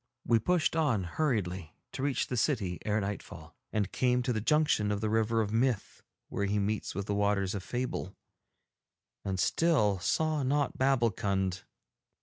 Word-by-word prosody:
We 115 -1 +4
pushed 170 - +1
on 140 - +2
hurriedly 95 - -2 0.2
to - - -5
reach 140 -1 0
the 125 - -4
city 105 - 0
ere 105 0 +1
nightfall, 100 0 -6 0.2
and 100 -3 -1
came 125 -1 +2
to 125 - 0
the 110 - -1
junction 150 -6 +2
of 100 - -1
the 110 0 -1
River 110 +1 +2
of 105 0 -2
Myth 120 -2 0 0.3
where 100 - -2
he 105 +1 0
meets 105 -1 -1
with 100 +1 -3
the 105 - -1
Waters 100 -1 +1
of 100 - -3
Fable, 120 -3 -4 1.1
and 95 -1 -2
still 105 - +2
saw 155 - +1
not 140 +1 0
Babbulkund. 100 -8 +1
110 Hz, 160 wpm, -30 LUFS, 100-130 Hz, 1.1 s, We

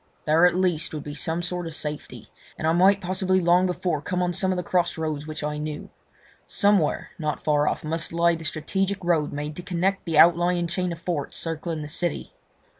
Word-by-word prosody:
There 160 +3 +5
at 175 - 0
least 170 -4 0
would 150 - -5
be 145 - -7
some 165 +3 -2
sort 175 -1 -3
of 160 - -5
safety, 150 -1 -6 0.3
and - - -4
I 160 - +3
might 195 +3 +4
possibly 185 +1 +1
long 180 +1 +4
before 175 -4 -1
come 180 +3 -1
on 180 0 0
some 190 +1 0
of 185 - -1
the 180 - -2
cross 175 -1 0
roads 155 -2 -3
which 155 -1 -5
I 150 0 -2
knew. 150 0 -6 0.6
Somewhere, 200 -7 +1
not 155 -2 -2
far 150 -1 +2
off, - - -1
must 165 +2 -1
lie 170 0 +3
the 165 0 -6
strategic 190 +6 -2
road 165 -4 +1
made 150 +1 -5
to - - -4
connect 190 +2 -1
the 165 -3 -1
outlying 175 +2 +5
chain 180 +1 -1
of 170 - -5
forts 170 -4 -3
circling 165 -1 -3
the - - -6
city. 170 +1 -2
170 Hz, 210 wpm, -25 LUFS, 155-180 Hz, 0.6 s, There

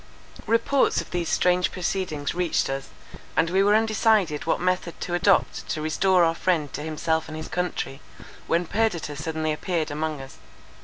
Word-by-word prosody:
Reports 230 +4 +2
of - - -6
these 175 -2 -2
strange 180 0 +2
proceedings 175 -5 -2
reached 175 -5 0
us, 135 0 -4 0.5
and 165 +1 +3
we 190 +1 +3
were 205 +1 +4
undecided 215 -7 +2
what - - +2
method 180 -1 -1
to 175 - -4
adopt 190 +2 +2
to - - -2
restore 180 +4 +3
our 165 0 +3
friend 160 -4 0
to 145 - -4
himself 160 +1 -1
and 155 0 -7
his 155 - -6
country, 160 -5 -3 0.5
when 170 +1 +1
Perdita 175 -7 -1
suddenly 155 +1 -2
appeared 160 0 -2
among 155 0 -2
us. 135 0 -10
170 Hz, 165 wpm, -25 LUFS, 155-185 Hz, 0.5 s, were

